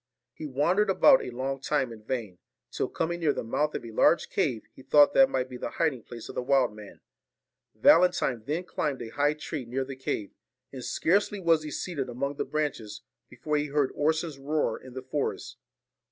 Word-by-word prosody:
He 155 - -7
wandered 175 +10 +1
about 265 +8 +6
a - - -5
long 135 +2 -3
time 135 -4 0
in 110 - -12
vain; 110 -7 -4 0.3
till - - -2
coming 170 +1 -2
near 155 -4 +2
the - - -4
mouth 150 +7 -1
of - - -4
a 115 - -8
large 160 +8 +3
cave, 120 -8 0
he - - -14
thought 145 +2 +5
that 270 0 +6
might 130 - -1
be 125 -1 -8
the - - -4
hiding 155 -7 +1
place 115 0 -10
of - - -8
the - - -2
wild 130 -2 +2
man. 105 -2 -12 0.7
Valentine 170 -9 +4
then 155 +6 -2
climbed 145 -6 -3
a 115 - -7
high 145 +5 +1
tree 150 -2 -5
near 130 +3 -3
the 135 0 -7
cave; 110 -6 -4 0.4
and 130 -2 -7
scarcely 200 +8 +1
was 165 -3 +3
he 155 - -6
seated 145 -4 -4
among 140 +4 -3
the - - -1
branches, 120 -9 -3 0.3
before 150 -1 -2
he 145 0 -1
heard 145 -1 +1
Orson's 155 0 -1
roar 150 +3 0
in 130 -1 -13
the 130 - -6
forest. 140 +2 -3
140 Hz, 200 wpm, -28 LUFS, 125-155 Hz, 0.7 s, about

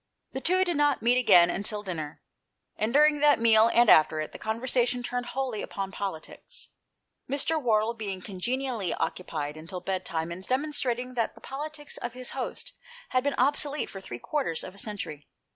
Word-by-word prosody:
The 265 - -4
two 370 +4 +3
did 350 -4 0
not 290 -4 +2
meet 245 +2 +4
again 175 -8 +6
until 205 +2 -3
dinner; 160 -6 -5 0.5
and 215 +2 -1
during 295 +2 +5
that 295 -2 +5
meal, 225 -1 +6
and 240 0 +5
after 155 -3 +6
it, 155 - -3
the - - -10
conversation 245 +2 0
turned 245 0 -3
wholly 255 -5 -2
upon 195 -1 -4
politics, 190 -5 -6 0.6
Mr. 295 +3 +1
Wardle 225 -2 +2
being 205 -5 -5
congenially 225 +2 -2
occupied 155 -4 -3
until 165 +4 -7
bed 185 +1 -2
time 165 -1 -3
in 175 +2 -6
demonstrating 255 0 0
that 235 -2 -1
the - - -16
politics 295 +1 -6
of 240 0 -5
his 255 0 -5
host 265 -2 -5 0.4
had 255 0 +1
been 285 -1 0
obsolete 285 +2 +1
for 195 - -8
three 120 -10 -7
quarters 260 - -2
of 185 - -8
a 200 - -14
century. 180 -9 -5
230 Hz, 175 wpm, -28 LUFS, 190-265 Hz, 0.6 s, again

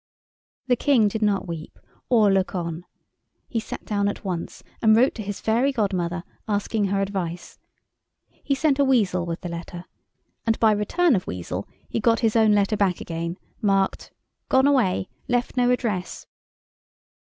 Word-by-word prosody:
The 250 -1 +3
King 245 -4 +3
did 220 +2 -4
not 205 -3 +1
weep 165 -2 -7 0.3
or 220 -5 +5
look 195 0 +1
on. 170 -1 -4 0.6
He 230 - -1
sat 220 - -7
down 200 -1 0
at 205 - -4
once 175 -3 -4 0.2
and 220 -1 +6
wrote 250 +4 +4
to 225 - -6
his 205 -1 -5
fairy 235 +5 +2
godmother, 185 -7 -1 0.2
asking 205 0 0
her 195 0 0
advice. 185 -3 -4 0.7
He 275 - -3
sent 280 0 +1
a - - +5
weasel 200 -10 +2
with 165 0 -4
the 175 - -5
letter, 170 +1 -7 0.6
and 225 -1 0
by 220 -1 +5
return 250 - +2
of 185 - -2
weasel 90 +2 -5 0.2
he - - -2
got 230 +1 +2
his 225 -2 +2
own 220 -2 +5
letter 205 +1 +2
back 195 -4 +1
again, 170 +1 -4 0.2
marked 195 -2 +1 0.4
"Gone 265 +1 +4
away. 245 -10 +2 0.2
Left 245 +1 0
no 245 -1 +3
address." 220 -7 -2
205 Hz, 165 wpm, -24 LUFS, 180-230 Hz, 0.7 s, and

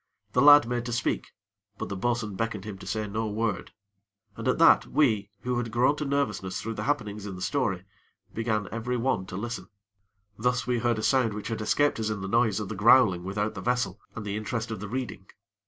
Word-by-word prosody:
The 125 - +3
lad 145 -2 +8
made 120 -1 -1
to - - -3
speak; 120 0 -1 0.5
but - - -5
the 100 - -3
bo'sun 110 0 -1
beckoned 110 -2 -3
to 105 - -7
him 95 -2 -8
to 95 - -10
say 110 +2 -2
no 110 +2 -2
word, 105 -2 -2 0.6
and - - -5
at - - +2
that - - +6
we, 110 -9 +2
who 125 -1 -1
had 120 -1 -3
grown 125 +5 +3
to 150 - -3
nervousness 105 -10 -1
through 115 - -4
the - - -4
happenings 105 -8 -2
in 95 - -6
the 90 - -9
story, 95 -5 -1 0.5
began 110 -3 -1
every 120 +3 -2
one 115 -6 0
to 95 - -6
listen. 110 -3 -5 0.7
Thus 125 +2 +1
we 125 -2 0
heard 120 -1 +1
a 110 - -3
sound 125 -5 +2
which 105 - -5
had 115 -1 -3
escaped 145 +5 +2
us 110 -1 -1
in 105 -2 -3
the 95 - -4
noise 110 -1 +2
of 105 - -4
the - - -3
growling 100 -4 +5
without 105 +3 -2
the 95 - -7
vessel, 125 +3 -1 0.2
and 105 - -6
the 100 0 -3
interest 115 +2 -3
of 110 - -4
the 105 0 -6
reading. 115 -6 -5
110 Hz, 225 wpm, -27 LUFS, 100-125 Hz, 0.7 s, lad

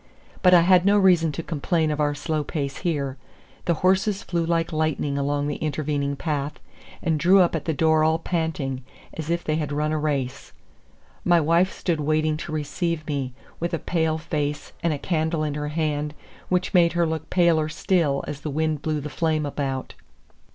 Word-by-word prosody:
But 180 -1 +7
I 175 - +7
had 180 +1 +5
no 200 +2 +4
reason 180 -5 +4
to 165 - -4
complain 160 0 0
of 150 - -2
our 145 0 +1
slow 155 0 -2
pace 140 -2 -3
here. 140 -6 -2 0.5
The 170 - +2
horses 195 +2 +2
flew 170 -2 -1
like 165 0 0
lightning 155 -2 0
along 145 +1 0
the 145 0 -2
intervening 145 -2 -1
path, 145 -1 -2 0.5
and 160 -3 +1
drew 185 +5 +6
up 175 -2 +3
at 155 - -3
the 160 - 0
door 160 +1 +3
all 160 +1 +3
panting, 160 -6 -2 0.3
as 160 -1 -6
if 170 0 0
they 155 0 0
had 150 -2 -2
run 150 +1 0
a 155 - 0
race. 140 -4 -2 0.7
My 175 -1 +5
wife 170 +4 +3
stood 170 -4 -2
waiting 155 +1 +1
to 155 - -6
receive 155 +1 -2
me, 140 -4 -3 0.3
with 170 0 -1
a - - -1
pale 160 -2 0
face, 150 -1 -3
and 170 - +1
a 150 - -1
candle 160 0 -1
in 150 -1 -1
her 150 0 -3
hand, 150 -1 -2 0.3
which 180 0 0
made 170 -2 +5
her 170 -1 +2
look 160 -1 -3
paler 170 -4 +3
still 155 -4 +1
as 145 -1 -5
the 155 - -4
wind 155 0 -1
blew 155 -1 -1
the 145 - -5
flame 155 +1 0
about. 135 -2 -3
155 Hz, 195 wpm, -24 LUFS, 145-170 Hz, 0.7 s, But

